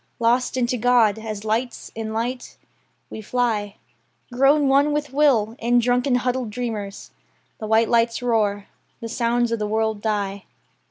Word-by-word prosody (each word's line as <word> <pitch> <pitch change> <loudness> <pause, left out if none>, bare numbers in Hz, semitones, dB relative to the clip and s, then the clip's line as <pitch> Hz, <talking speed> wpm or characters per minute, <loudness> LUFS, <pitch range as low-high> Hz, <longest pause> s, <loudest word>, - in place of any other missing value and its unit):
Lost 245 +2 +1
into 250 0 0
God, 230 -3 +3
as 215 -1 -6
lights 230 +3 -2
in 220 -1 -5
light, 240 +3 -4 0.5
we 220 - -7
fly, 215 -3 -1 0.6
Grown 275 +3 +4
one 280 +2 +3
with 295 -2 -3
will, 245 -7 +2
end 240 +1 +2
drunken 250 +2 +2
huddled 250 -1 -1
dreamers. 210 -4 -5 0.5
The 215 - -5
white 220 +1 +3
lights 230 0 +2
roar. 210 -4 0 0.3
The 230 - -6
sounds 235 0 0
of 230 - -1
the 210 - -2
world 220 0 -1
die. 200 -3 -2
230 Hz, 150 wpm, -22 LUFS, 220-250 Hz, 0.6 s, Grown